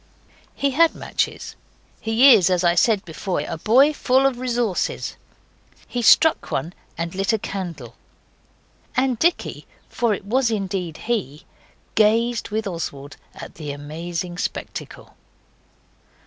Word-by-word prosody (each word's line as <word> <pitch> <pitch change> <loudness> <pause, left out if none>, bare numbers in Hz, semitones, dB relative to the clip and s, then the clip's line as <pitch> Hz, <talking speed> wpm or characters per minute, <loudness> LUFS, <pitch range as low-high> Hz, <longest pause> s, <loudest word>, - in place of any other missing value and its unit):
He 280 0 0
had 330 +4 +3
matches. - - -3 0.4
He 235 +5 +6
is, 190 -5 +4
as 180 -1 +1
I 170 -1 +4
said 200 +3 +2
before, 175 +3 -3
a 165 - -5
boy 265 - +4
full 265 -1 +2
of 265 -3 +1
resources. 240 -6 -1 0.7
He 245 - -3
struck 320 +7 +5
one 160 +6 -3 0.2
and 170 0 -3
lit 195 +3 0
a - - +3
candle, 170 - -6 1.0
and 255 -3 +1
Dicky, 345 +5 0 0.2
for 235 -3 0
it 190 - -11
was 245 +3 +1
indeed 190 -6 -3
he, 195 - -3 0.5
gazed 225 +2 +2
with 220 +1 -2
Oswald 145 -6 -6 0.2
at - - -9
the 150 - -5
amazing 170 +5 -5
spectacle. - - -6
210 Hz, 130 wpm, -22 LUFS, 170-240 Hz, 1.0 s, He